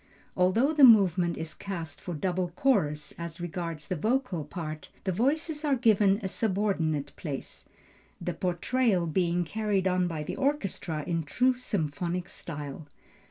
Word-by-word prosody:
Although 220 +11 +3
the 295 -2 +4
movement 190 -7 +6
is 160 -1 -4
cast 170 -6 -6
for 175 - -5
double 180 +2 -1
chorus 160 - +1
as 170 0 -6
regards 165 -3 -4
the 185 - -1
vocal 220 - 0
part, 155 0 -6
the 190 - 0
voices 295 - 0
are 290 -3 +3
given 210 -5 +4
a - - 0
subordinate 190 -8 0
place, 145 -5 -6 0.5
the 175 0 -3
portrayal 185 +3 +1
being 175 +1 +1
carried 200 +1 0
on 180 -1 +2
by 160 -3 -3
the - - -5
orchestra 200 - -1
in 165 -2 0
true 250 - +2
symphonic 175 - -2
style. 145 -1 -7
180 Hz, 145 wpm, -28 LUFS, 165-215 Hz, 0.5 s, movement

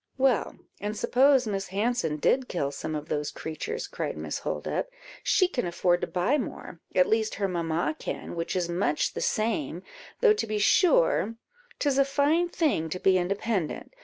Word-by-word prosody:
"Well, 260 -4 +2 0.2
and 210 +1 -4
suppose 265 +2 +4
Miss 195 -2 -2
Hanson 200 -5 0
did 255 - +2
kill 140 -6 -2
some 155 +2 -4
of 150 0 -5
those 150 -1 -1
creatures," 300 - -5
cried - - -4
Miss - - -4
Holdup, - - -3 0.3
"she 370 - +3
can 255 - -2
afford 175 0 +1
to - - -1
buy 210 +12 +1
more; 185 -7 -6 0.2
at 180 - +6
least, 220 0 +1
her 200 - 0
mamma 165 -3 -1
can, - - -5
which 165 +2 -3
is 180 -2 0
much 170 -3 0
the - - -4
same; 230 +8 -1 0.4
though 455 -3 +6
to 425 - -2
be 215 0 -1
sure, 335 - +3 0.4
'tis 280 -2 +1
a - - +7
fine 300 +5 +2
thing 290 - 0
to 185 - -4
be 185 0 +4
independent. 195 - -2
205 Hz, 175 wpm, -27 LUFS, 175-270 Hz, 0.4 s, a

